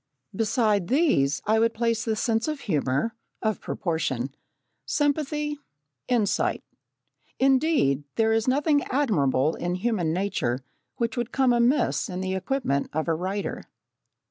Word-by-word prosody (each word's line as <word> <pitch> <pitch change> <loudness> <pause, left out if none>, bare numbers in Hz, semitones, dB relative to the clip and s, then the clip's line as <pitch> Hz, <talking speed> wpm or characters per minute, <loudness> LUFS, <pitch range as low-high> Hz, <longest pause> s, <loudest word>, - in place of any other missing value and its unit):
Besides 215 -3 +1
these 200 - +2
I 220 +1 +3
would 230 0 +2
place 230 -1 0
the 220 -2 0
sense 225 +2 0
of 305 -2 -3
humour, 150 - 0 0.3
of 215 -1 0
proportion, 140 -7 -2 0.5
sympathy, 295 0 -1 0.5
insight, 220 -5 +1 0.7
indeed, 265 - +3
there 225 0 +3
is 225 +1 +1
nothing 285 +3 +3
admirable 160 - +1
in 175 +1 -2
human 185 -5 0
nature 160 -9 -1 0.3
which 235 -2 -2
would 240 -1 -2
come 265 -2 +3
amiss 240 +1 +2
in 180 0 -4
the 190 0 -2
equipment 190 - -1
of 155 +2 -1
a 165 - +2
writer. 190 +5 -3
220 Hz, 130 wpm, -26 LUFS, 170-260 Hz, 0.7 s, I